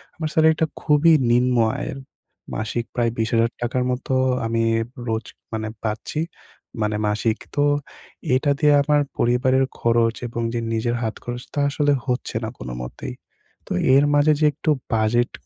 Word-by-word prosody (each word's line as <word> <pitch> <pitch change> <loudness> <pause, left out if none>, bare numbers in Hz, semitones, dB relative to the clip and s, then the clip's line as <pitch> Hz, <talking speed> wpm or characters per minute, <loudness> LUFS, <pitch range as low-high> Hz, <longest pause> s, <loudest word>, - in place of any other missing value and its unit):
আমার 160 -2 -3
সেলারিটা 160 0 +4 0.2
খুবই 155 +2 +5 0.2
নিম্ন 125 +1 +3 0.2
আয়ের। - - -4 0.6
মাসিক 115 +2 -2
প্রায় 120 -1 +1
২০,০০০ 115 +1 +2
টাকার 120 +1 0
মতো 125 +1 -3 0.3
আমি 115 0 0 0.4
রোজ 110 0 -1 0.6
পাচ্ছি 110 +7 -3 0.6
মানে 105 0 0
মাসিক। 110 +2 0 0.2
তো 145 - +3 0.7
এটা 140 +2 +2
দিয়ে 150 -1 +5
আমার 150 +1 +3 0.2
পরিবারের 130 +2 +3
খরচ 115 -1 +2
এবং 120 0 -4
যে 120 - -1
নিজের 120 +1 0
হাতখরচ, 120 +2 -5
তা 145 - -1
আসলে 145 0 +2
হচ্ছে 125 -3 -2
না 110 - -2
কোনোমতেই। 60 -1 -6 0.5
তো - - -11 0.2
এর 140 - +6
মাঝে 145 +1 +5
যে 155 - +3
একটু 155 - -3 0.2
বাজেট 115 +2 +2
120 Hz, 140 wpm, -22 LUFS, 115-145 Hz, 0.7 s, এর